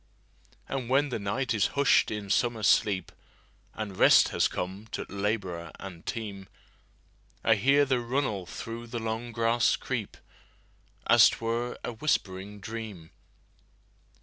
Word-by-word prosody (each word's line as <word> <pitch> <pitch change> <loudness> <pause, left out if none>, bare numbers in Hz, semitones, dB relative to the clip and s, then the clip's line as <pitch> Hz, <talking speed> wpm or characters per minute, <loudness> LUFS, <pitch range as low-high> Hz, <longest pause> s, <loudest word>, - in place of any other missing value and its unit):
And 130 -3 -4
when 140 +2 +3
the 120 - -3
night 115 +6 -1
is 105 -4 +2
hush'd 140 -1 +4
in 105 -2 -4
summer 120 -2 +1
sleep, 95 -4 +2 0.6
And 105 -3 -5
rest - - +6
has - - +2
come 95 +4 -5
to - - -3
laborer 100 -5 -3
and 90 -4 -9
team,I 105 +1 -5
hear 140 +7 +4
the 130 -2 +1
runnel 120 -6 -2
through 115 +4 -7
the 120 +1 -5
long 115 +1 -3
grass 115 +1 +2
creep, - - -4 0.9
As - - +7
't - - -5
were 115 +2 -2
a 120 - -4
whispering 105 -6 -2
dream. 105 -6 -7
110 Hz, 130 wpm, -28 LUFS, 100-120 Hz, 0.9 s, As